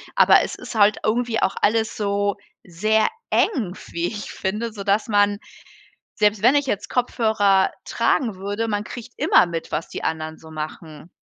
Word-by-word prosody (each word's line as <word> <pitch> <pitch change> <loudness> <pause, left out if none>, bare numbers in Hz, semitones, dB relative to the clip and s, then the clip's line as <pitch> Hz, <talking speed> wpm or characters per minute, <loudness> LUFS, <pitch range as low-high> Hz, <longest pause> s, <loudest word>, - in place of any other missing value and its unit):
aber - - +6
es - - -4
ist - - -9
halt 210 -1 +4
irgendwie 230 +1 0
auch 190 - +1
alles 220 +1 +1
so 200 -1 0 0.3
sehr 215 +5 +1 0.2
eng, 230 - +1
f - - -13
wie 170 +1 -1
ich 210 +1 -6
finde, 215 +4 -3
sodass 200 +1 0
man 205 -1 +3 0.8
selbst 210 -1 +2
wenn 250 +4 +6
ich 285 -1 +2
jetzt 205 - -2
Kopfhörer 215 -6 +2
tragen 235 -8 0
würde, 205 +4 -3
man 205 -1 -1
kriegt 240 +1 -9
immer 180 - +5
mit, 165 -1 -5
was 155 +2 -2
die - - -7
anderen 160 0 -3
so 160 - -14
machen. 155 +1 -8
205 Hz, 170 wpm, -22 LUFS, 185-220 Hz, 0.8 s, aber